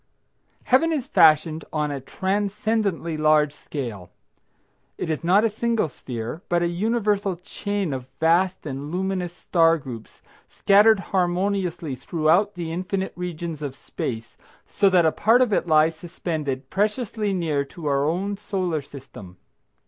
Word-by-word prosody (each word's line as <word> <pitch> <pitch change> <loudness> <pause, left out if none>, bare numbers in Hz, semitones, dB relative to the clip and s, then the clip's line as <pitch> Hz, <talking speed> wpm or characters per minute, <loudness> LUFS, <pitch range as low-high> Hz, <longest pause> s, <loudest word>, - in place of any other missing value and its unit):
Heaven 295 +6 +3
is 290 -6 -1
fashioned 160 - +4
on 150 -1 -1
a 140 -2 -4
transcendently 200 - -1
large 155 -1 +3
scale. 115 - -6 0.9
It 160 - -2
is 155 - -3
not 190 +5 +4
a - - +4
single 225 -2 0
sphere, 120 +3 -6
but 175 0 +2
a - - +2
universal 205 +1 0
chain 195 0 -3
of 130 -1 -5
vast 175 +3 +2
and 140 0 -5
luminous 185 -1 -2
star 165 -2 +2
groups, 125 -6 -10 0.3
scattered 210 +2 +5
harmoniously 180 -3 0
throughout 165 +9 +1
the 170 -2 -4
infinite 185 +3 -3
regions 170 -3 -5
of 140 -3 -4
space, 115 -4 -6 0.3
so 200 - +2
that 180 -3 +4
a 160 - +4
part 225 +8 +3
of 250 -5 +2
it 175 - +1
lies 155 0 +4
suspended 155 -6 -4
preciously 210 0 -1
near 160 -6 0
to 155 +3 -11
our 140 -1 +1
own 190 +7 -1
Solar 185 -6 -2
System. 130 -10 -12
175 Hz, 140 wpm, -24 LUFS, 150-200 Hz, 0.9 s, scattered